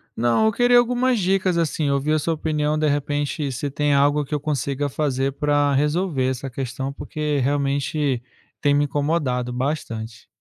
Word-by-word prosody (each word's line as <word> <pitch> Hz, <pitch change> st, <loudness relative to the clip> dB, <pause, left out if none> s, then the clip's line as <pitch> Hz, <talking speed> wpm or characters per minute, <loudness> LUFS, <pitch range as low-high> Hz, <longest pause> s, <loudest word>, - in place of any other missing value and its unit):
Não, 120 Hz, -, +2 dB
eu 220 Hz, -, +4 dB
queria 245 Hz, +2 st, +4 dB
algumas 245 Hz, +1 st, +2 dB
dicas, 190 Hz, -1 st, +1 dB
assim, 155 Hz, -2 st, 0 dB
ouvir 140 Hz, +2 st, 0 dB
a 155 Hz, -, +2 dB
sua 165 Hz, +2 st, 0 dB
opinião, 150 Hz, -1 st, -1 dB
de 155 Hz, 0 st, +1 dB
repente, 145 Hz, 0 st, -1 dB
se 130 Hz, +3 st, -3 dB
tem 145 Hz, +1 st, 0 dB
algo 145 Hz, +1 st, +3 dB
que 150 Hz, -, -3 dB
eu 145 Hz, -, -3 dB
consiga 145 Hz, -1 st, -1 dB
fazer 135 Hz, -1 st, -1 dB
para 145 Hz, 0 st, +1 dB
resolver 150 Hz, -1 st, +1 dB
essa 130 Hz, +1 st, -4 dB
questão, 135 Hz, +1 st, -4 dB
porque 150 Hz, +1 st, -3 dB
realmente, 140 Hz, -1 st, 0 dB, 0.4 s
tem 145 Hz, -1 st, +2 dB
me 145 Hz, 0 st, +3 dB
incomodado 140 Hz, -4 st, -1 dB
bastante. 115 Hz, -4 st, -4 dB
145 Hz, 165 wpm, -22 LUFS, 135-155 Hz, 0.4 s, eu